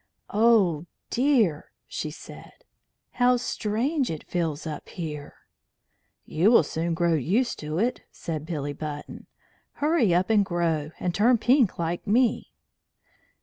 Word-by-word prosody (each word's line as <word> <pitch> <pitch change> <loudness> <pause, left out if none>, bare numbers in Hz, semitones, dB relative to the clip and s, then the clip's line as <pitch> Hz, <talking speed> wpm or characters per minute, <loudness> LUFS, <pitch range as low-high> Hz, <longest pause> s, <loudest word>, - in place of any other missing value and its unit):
"Oh, 200 -8 +3 0.2
dear," 235 - +2 0.2
she - - -4
said, - - -13 0.5
"how 245 0 +3
strange 245 +5 -1
it 160 -2 -5
feels 165 -4 -2
up 155 -2 -6
here!" 150 -5 -6 0.9
"You 170 +7 +2
will 235 - +6
soon 165 +3 -2
grow 170 0 +2
used 195 - 0
to 155 +1 -4
it," 240 +6 0
said 155 -3 -5
Billy 145 -3 -3
Button. 145 0 -7 0.5
"Hurry 295 - +2
up 180 +5 +2
and 210 -2 +5
grow, 165 -5 -1
and 180 - -1
turn 235 +6 +4
pink 245 -1 +3
like 170 +1 -3
me." 235 +2 +2
180 Hz, 130 wpm, -26 LUFS, 160-235 Hz, 0.9 s, will